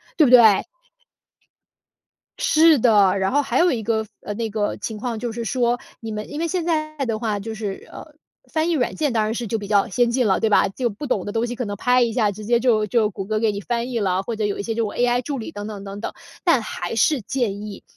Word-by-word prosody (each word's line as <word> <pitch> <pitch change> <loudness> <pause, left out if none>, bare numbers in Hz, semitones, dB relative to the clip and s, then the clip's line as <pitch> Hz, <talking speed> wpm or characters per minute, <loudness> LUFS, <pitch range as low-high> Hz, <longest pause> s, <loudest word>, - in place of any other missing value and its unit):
对 325 - +5
不 250 - +2
对？ 225 -5 +7 1.7
是 315 0 +5
的。 205 -5 +4
然 190 0 0
后 290 - +3
还 280 - 0
有 350 +1 +4
一 235 - -2
个 220 0 0 0.2
呃， 210 - -5
那 225 0 -2
个 210 -1 -2
情 220 - -5
况 230 +1 -3
就 240 0 -3
是 235 +1 -5
说， 245 0 +1 0.2
你 225 -1 -6
们 215 0 -5
因 295 - -5
为 335 - 0
现 355 -1 -2
在 310 -2 -1
的 225 -3 -1
话， 215 -3 -1
就 220 +3 -6
是， 205 -3 -5
呃， 310 - -11 0.4
翻 315 +1 0
译 - - +2
软 255 -7 0
件 295 -3 0
当 220 -2 +2
然 215 +1 -1
是 235 0 -4
就 225 - -1
比 205 - -7
较 200 +1 +3
先 235 +3 +1
进 250 0 +1
了， 190 - +2
对 220 - +1
吧？ 205 - +4
就 240 +5 -2
不 215 +7 -7
懂 210 -7 -1
的 205 - -4
东 225 +2 0
西 245 - -5
可 245 - -3
能 205 -1 -4
拍 250 +4 +2
一 235 -2 +1
下， 215 -3 +2
直 210 +1 -9
接 235 +2 +3
就 230 -4 +2
就 215 0 +1
谷 195 -1 -6
歌 215 +2 -1
给 220 -1 +2
你 200 0 -5
翻 235 +3 -2
译 235 - -1
了， 190 -2 0
或 230 +2 -4
者 215 -1 -1
有 205 - -2
一 - - -2
些 225 - -2
这 230 - 0
种 220 - -1
AI 245 0 +1
助 280 +2 -4
理 225 - -6
等 205 0 -6
等 205 -2 -7
等 200 0 -7
等。 225 - -5 0.3
但 - - +4
还 - - -5
是 300 -6 +2
建 210 -3 -2
议， 210 -2 -8
225 Hz, 290 characters per minute, -22 LUFS, 210-245 Hz, 1.7 s, 对